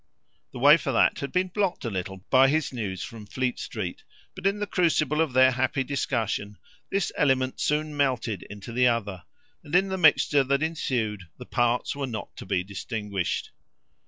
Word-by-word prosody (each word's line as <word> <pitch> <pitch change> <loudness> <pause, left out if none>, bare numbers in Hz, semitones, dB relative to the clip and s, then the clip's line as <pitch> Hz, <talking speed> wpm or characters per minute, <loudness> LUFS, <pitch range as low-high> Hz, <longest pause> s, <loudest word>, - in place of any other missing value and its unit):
The - - -9
way 145 +5 +7
for 140 -3 -3
that - - +3
had 140 - -4
been 185 0 +1
blocked 190 -5 -1
a 115 - -2
little 95 0 -5
by 130 0 +7
his 150 0 0
news 100 -6 -4
from 110 -3 -9
Fleet 125 +2 -2
Street; 95 -6 -5 0.3
but - - -2
in 200 +1 +1
the 205 - -2
crucible 160 -5 +1
of 155 -5 0
their 130 +1 +6
happy 130 +2 0
discussion 115 -6 -2 0.3
this 195 -4 0
element 130 -2 +1
soon 150 0 0
melted 125 -8 0
into 105 +2 -9
the 125 +2 +3
other, 100 -8 -1 0.4
and 145 - -4
in 190 +2 +4
the 190 0 -2
mixture 150 -3 +5
that 140 +2 +1
ensued 115 - -2
the - - -9
parts 120 +2 0
were 140 -1 -3
not 115 -3 -6
to - - -9
be 90 - 0
distinguished. 100 -1 -3
130 Hz, 185 wpm, -26 LUFS, 110-150 Hz, 0.4 s, way